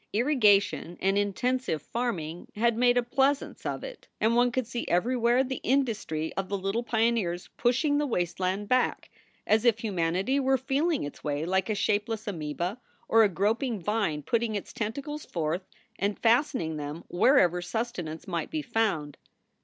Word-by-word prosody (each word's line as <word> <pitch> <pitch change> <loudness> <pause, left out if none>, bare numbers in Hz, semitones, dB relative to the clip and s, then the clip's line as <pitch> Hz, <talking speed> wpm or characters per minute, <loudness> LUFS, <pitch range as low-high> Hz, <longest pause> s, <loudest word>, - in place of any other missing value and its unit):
Irrigation 205 - +3
and 195 +1 +1
intensive 205 0 0
farm 235 - -2
ing 160 +2 -7
had 235 +2 +2
made 245 +1 +3
a 245 - +3
pleasaunce 270 +3 0
of - - -3
it - - -9
and 225 +2 +2
one 245 0 +4
could 255 0 -1
see 240 +1 -4
everywhere 240 +6 +2
the 265 -1 -4
industry 220 - 0
of 195 -1 -3
the 200 - -1
little 195 +4 -1
pioneers 225 -7 0
pushing 285 +5 +2
the 295 - 0
wasteland 185 -1 -1
back, 255 +2 +1 0.3
as 215 +1 +3
if 235 -3 +4
humanity 195 +4 0
were 265 0 +3
feeling 280 +5 0
its 145 - -8
way 150 +1 -1
like 190 +2 0
a 215 - +1
shapeless 215 +2 0
amceba 175 +2 -3 0.3
or 225 - +5
a 210 - +4
groping 215 - 0
vine 190 -6 -1
putting 230 +4 0
its 205 - -5
tentacles 280 +8 -4
forth 170 +2 -3 0.3
and 200 +1 0
fastening 230 - +2
them 150 +2 -6
wherever 180 - +4
sustenance 180 -5 -4
might 170 -3 -3
be 310 -1 -3
found. 210 - -1
220 Hz, 160 wpm, -28 LUFS, 180-245 Hz, 0.3 s, or